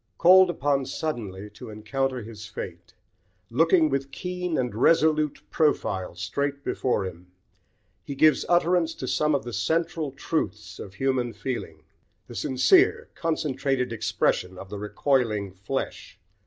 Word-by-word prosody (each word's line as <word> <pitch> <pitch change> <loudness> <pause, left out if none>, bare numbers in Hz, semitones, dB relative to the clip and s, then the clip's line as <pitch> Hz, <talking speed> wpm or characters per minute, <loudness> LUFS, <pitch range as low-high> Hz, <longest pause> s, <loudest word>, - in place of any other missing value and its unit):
Called 185 +1 +7
upon 140 -4 0
suddenly 105 -10 -4
to 110 +3 -10
encounter 125 +4 -2
his 105 -2 -9
fate, 105 - -8 0.6
looking 165 +5 +4
with 135 -1 -2
keen 180 +1 -3
and 125 -4 -1
resolute 155 +5 +3
profile 145 - 0
straight 140 0 -3
before 120 -8 0
him, 90 -1 -8 0.8
he 140 - -6
gives 155 +1 +4
utterance 175 -1 +2
to - - -6
some 150 -1 +2
of 135 - -1
the 120 - -7
central 165 -1 -1
truths 135 -6 -3
of 100 -1 -9
human 130 -1 0
feeling, 130 -2 -5 0.4
the - - -11
sincere, 380 - +3
concentrated 135 -6 -1
expression 95 -4 0
of 95 - -9
the 105 - -5
recoiling 105 -1 0
flesh. 100 +8 -5
135 Hz, 130 wpm, -26 LUFS, 110-160 Hz, 0.8 s, Called